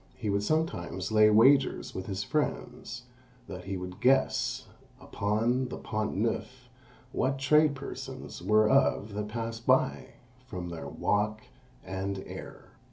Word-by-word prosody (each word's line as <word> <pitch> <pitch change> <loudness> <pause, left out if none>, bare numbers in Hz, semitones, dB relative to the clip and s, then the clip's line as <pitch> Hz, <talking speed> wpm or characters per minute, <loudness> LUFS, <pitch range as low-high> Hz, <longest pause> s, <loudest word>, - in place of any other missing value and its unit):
He 105 - -2
would 100 0 +1
sometimes 100 - -1
lay 110 0 +6
wagers 130 +6 +4
with 95 - -5
his 95 0 -3
friends, 125 -1 -3 0.4
that 90 0 -8
he 95 0 -3
would 90 0 -7
guess, 130 -1 +2 0.3
upon 115 +5 0
the - - -6
Pont 110 -2 -3
Neuf, 125 +4 -2 0.4
what 135 +1 0
trade 150 +2 +4
persons 140 - -7
were 110 0 +4
of 110 -4 +2
that 105 0 -3
passed 115 +1 -5
by, - - +2 0.3
from 90 -4 -5
their 85 -1 -6
walk 105 +2 0 0.4
and 95 +1 -3
air. - - -10
110 Hz, 135 wpm, -29 LUFS, 100-130 Hz, 0.4 s, lay